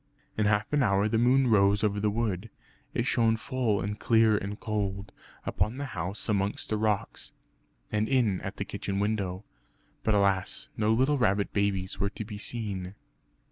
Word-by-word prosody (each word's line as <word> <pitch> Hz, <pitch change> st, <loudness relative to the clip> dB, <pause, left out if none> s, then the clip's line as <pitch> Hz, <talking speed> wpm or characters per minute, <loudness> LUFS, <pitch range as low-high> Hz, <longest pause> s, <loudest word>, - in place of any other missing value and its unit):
In 105 Hz, -1 st, +1 dB
half 105 Hz, +4 st, +1 dB
an 145 Hz, -, +3 dB
hour 100 Hz, -3 st, +3 dB
the 110 Hz, +1 st, +1 dB
moon 130 Hz, +3 st, +4 dB
rose 100 Hz, -3 st, +4 dB
over 105 Hz, -1 st, +1 dB
the 105 Hz, +1 st, +1 dB
wood. 105 Hz, -1 st, -2 dB, 0.4 s
It -, -, -1 dB
shone 115 Hz, -1 st, +2 dB
full 120 Hz, -4 st, 0 dB
and 105 Hz, +1 st, -4 dB
clear 110 Hz, -2 st, +4 dB
and 105 Hz, +1 st, -3 dB
cold, 100 Hz, -2 st, -3 dB, 0.3 s
upon 110 Hz, +4 st, -1 dB
the 140 Hz, -, -3 dB
house 90 Hz, +6 st, -4 dB
amongst 100 Hz, -2 st, -1 dB
the 110 Hz, -, +1 dB
rocks, 105 Hz, -2 st, -2 dB, 0.6 s
and 105 Hz, +1 st, 0 dB
in 120 Hz, -8 st, +2 dB
at 95 Hz, -, -6 dB
the 100 Hz, -, -3 dB
kitchen 100 Hz, 0 st, -4 dB
window. 100 Hz, -2 st, -1 dB, 0.6 s
But 110 Hz, -, +2 dB
alas, 100 Hz, -2 st, +1 dB
no 110 Hz, 0 st, +1 dB
little 130 Hz, +5 st, +2 dB
rabbit 100 Hz, -3 st, +1 dB
babies 100 Hz, -2 st, 0 dB
were 100 Hz, -, +1 dB
to 110 Hz, +1 st, -7 dB
be 105 Hz, -1 st, -7 dB
seen! 100 Hz, -5 st, -3 dB
105 Hz, 175 wpm, -28 LUFS, 100-110 Hz, 0.6 s, moon